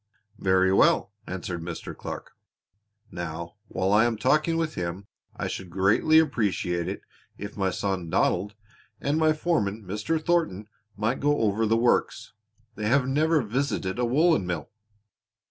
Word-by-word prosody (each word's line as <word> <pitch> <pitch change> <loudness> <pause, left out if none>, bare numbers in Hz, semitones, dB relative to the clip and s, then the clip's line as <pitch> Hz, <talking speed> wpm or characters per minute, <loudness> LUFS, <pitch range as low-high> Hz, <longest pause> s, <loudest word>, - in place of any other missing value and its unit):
"Very 95 0 +3
well," 95 - +4 0.2
answered 90 -1 -4
Mr. 85 0 -6
Clark. - - -7 0.8
"Now 85 +1 -6
while 95 +2 0
I 110 +2 +5
am 115 -2 0
talking 155 +7 +2
with 165 -1 -1
him 90 +3 -4 0.3
I - - -3
should 95 - -5
greatly 95 - +3
appreciate 105 - +1
it - - -5 0.3
if 100 +1 -7
my 95 -2 0
son 95 -3 -2
Donald, 95 +5 +1 0.4
and 145 +3 0
my 155 -1 +4
foreman, 115 - -1
Mr. 105 - -2
Thornton, 155 - 0 0.3
might 110 +5 0
go 145 -1 +2
over 110 +1 +1
the 115 +1 +3
works. 120 -2 +1 0.4
They 105 0 -3
have 130 +2 +3
never 155 +2 +2
visited 115 -3 -2
a 125 - +2
woolen 140 - +3
mill." 85 -4 -4
105 Hz, 145 wpm, -26 LUFS, 95-140 Hz, 0.8 s, I